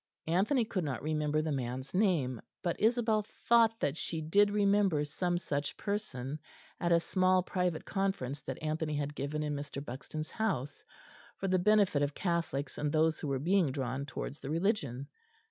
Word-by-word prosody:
Anthony 210 - +2
could 195 -5 -2
not 140 -5 -3
remember 155 0 0
the 155 - -1
man's 130 0 -3
name, 165 - +2 0.2
but 175 -2 0
Isabel 225 -1 +3 0.3
thought 230 -1 +5
that 140 - +1
she 165 0 -3
did 200 +7 +4
remember 200 -6 +3
some 175 +4 -1
such 145 -4 -3
person 155 -10 -3 0.4
at 175 - 0
a 170 - +6
small 185 +1 +2
private 180 -3 -1
conference 190 -9 -1
that 130 0 -5
Anthony 155 0 -1
had 145 0 -2
given 145 +2 -3
in 150 -1 -1
Mr. 140 0 -5
Buxton's 155 +5 -6
house, 170 - -2 0.5
for 195 - -2
the 185 0 +3
benefit 200 -6 +4
of 145 0 0
Catholics 165 -6 -2
and 150 0 0
those 160 0 +2
who - - -4
were 135 -1 0
being 170 +1 +2
drawn 130 0 -3
towards 140 +2 -5
the 135 - -7
Religion. 150 - 0
155 Hz, 170 wpm, -32 LUFS, 140-195 Hz, 0.5 s, a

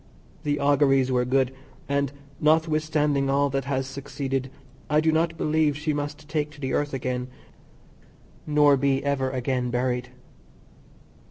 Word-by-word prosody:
The 145 -1 -1
auguries 135 -2 +3
were 125 -1 +2
good, 130 0 +1 0.3
and, 140 -1 0 0.3
notwithstanding 155 -2 +2
all 140 0 +2
that 135 -1 -1
has 135 -1 -1
succeeded, 135 -1 -4 0.4
I 150 0 +4
do 160 +1 +3
not 165 +1 +1
believe 155 -2 +1
she 155 +1 -1
must 145 0 -5
take 150 0 -1
to 145 - -15
the 130 -2 -3
earth 145 0 0
again, 125 -1 -2 1.2
nor 145 -2 +5
be 135 0 +1
ever 135 -2 0
again 125 -1 -1
buried. 125 0 -1
140 Hz, 140 wpm, -25 LUFS, 130-150 Hz, 1.2 s, nor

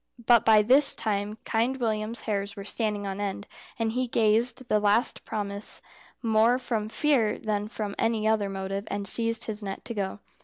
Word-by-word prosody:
But 235 -1 +6
by 220 -2 +6
this 270 +6 +5
time 210 -1 -2
Kind 235 +4 0
William's 220 -1 -1
hairs 200 -1 -3
were 200 -2 -8
standing 210 -1 -2
on 195 +1 -4
end, 200 0 -3 0.3
and 225 -1 0
he 250 +2 -1
gave 230 +1 +2
the 240 -5 0
last 210 +3 +2
promise 200 -1 -4 0.4
more 225 +2 +3
from 225 -4 -3
fear 250 -5 +1
than 210 -1 -2
from 210 -2 -5
any 225 -1 +1
other 215 -2 +1
motive, 195 +1 -4
and 200 -1 -2
seized 230 +2 +2
his 215 -1 -3
net 195 -1 -6
to 235 - -4
go. 200 -1 -3
215 Hz, 180 wpm, -27 LUFS, 205-230 Hz, 0.4 s, But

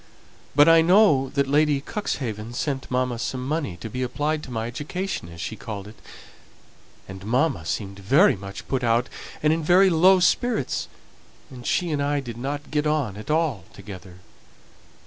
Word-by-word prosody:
But 145 +2 +7
I 165 0 +7
know 165 -7 +4
that 140 -1 +2
Lady 145 +1 +2
Cuxhaven 120 - -4
sent 135 0 -3
mamma 125 -2 -1
some 130 +2 -3
money 145 - -2
to 100 - -7
be 125 +4 -5
applied 145 +5 -1
to 135 - -10
my 110 -2 -2
education, 145 - -4
as 85 0 -12
she 110 - -4
called 105 -3 -7
it; 110 - -14 1.1
and 95 0 -9
mamma 125 - 0
seemed 100 -2 -4
very 140 - +4
much 100 0 -9
put 130 -2 -1
out 120 +2 +2 0.3
and 155 0 +4
in 165 0 -2
very 185 +4 +5
low 185 +3 +5
spirits, 200 - +1 0.6
and 125 -2 -9
she 175 -2 0
and 145 -2 -1
I 145 0 0
didn't 135 +3 -5
get 150 0 0
on 145 -10 0
at 105 +6 -10
all 150 - 0
together. 95 -2 -11
135 Hz, 165 wpm, -24 LUFS, 110-155 Hz, 1.1 s, But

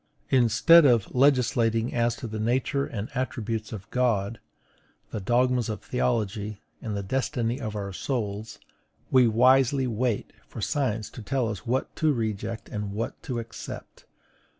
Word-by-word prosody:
Instead 130 +7 +6
of 120 -7 +3
legislating 125 -3 +3
as 120 -1 +1
to - - -8
the 110 -1 -4
nature 130 +5 0
and 105 -1 -4
attributes 115 -3 -3
of 105 -2 -7
God, 115 -4 +1 0.7
the 110 - -3
dogmas 125 +3 +2
of 105 - -4
theology, 105 -4 -1 0.2
and 105 -3 -3
the 100 - -3
destiny 125 +2 -1
of 110 -4 -4
our 100 -2 -4
souls, 110 -2 -3 0.5
we 130 -2 +6
wisely 130 +3 +4
wait 120 -1 -1
for - - -9
science 110 -2 -1
to - - -9
tell 120 +2 -1
us 105 -3 -6
what 130 +3 -1
to 155 -1 +3
reject 110 -1 -3
and 105 -3 -4
what 110 +3 -4
to 125 - -4
accept. 115 0 -8
115 Hz, 150 wpm, -26 LUFS, 110-125 Hz, 0.7 s, Instead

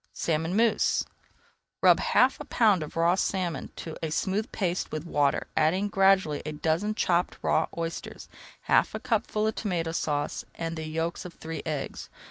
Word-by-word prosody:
SALMON 165 +2 -1
MOUSSE 230 0 +2 0.8
Rub - - +7
half - - +3
a - - -7
pound 210 -7 +3
of 150 - -7
raw 170 +1 +4
salmon 180 -5 -1
to 160 - -7
a 160 - -2
smooth 195 +7 -1
paste 180 -3 -2
with 155 +1 -4
water, 145 -4 +1
adding 185 +6 +2
gradually 190 -6 +3
a 155 - -5
dozen 165 +8 0
chopped 175 -4 +1
raw - - +2
oysters, 165 0 -5 0.3
half - - +2
a - - -3
cupful 215 -1 0
of 220 - +1
Tomato 175 -7 -2
Sauce 145 -3 -2
and 165 0 -4
the 160 -1 -5
yolks 165 +2 -2
of 180 -2 -9
three 160 0 -6
eggs. 150 -3 -4
170 Hz, 165 wpm, -27 LUFS, 155-195 Hz, 0.8 s, Rub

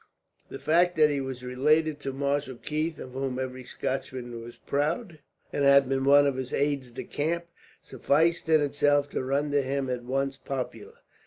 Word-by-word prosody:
The - - -6
fact 175 +3 +2
that 150 -1 +5
he 140 -1 -1
was 130 -1 -6
related 150 +4 +2
to 140 -1 -4
Marshal 140 0 -1
Keith, 155 +5 -3
of 130 - -8
whom 130 0 -3
every 130 0 -4
Scotchman 125 -2 -4
was 120 +1 -10
proud, 160 +5 -2 0.3
and 145 - 0
had 140 -1 +6
been 135 0 0
one 145 +1 +7
of 140 -2 0
his 130 -1 -5
aides 140 -3 0
de 120 - -6
camp, 170 +3 -2 0.4
sufficed 160 +3 +1
in 155 -1 +5
itself 145 0 +2
to 130 - -3
render 145 +2 +1
him 135 0 -2
at 125 -1 -3
once 135 +2 -1
popular. 135 -2 -6
140 Hz, 175 wpm, -27 LUFS, 130-150 Hz, 0.4 s, one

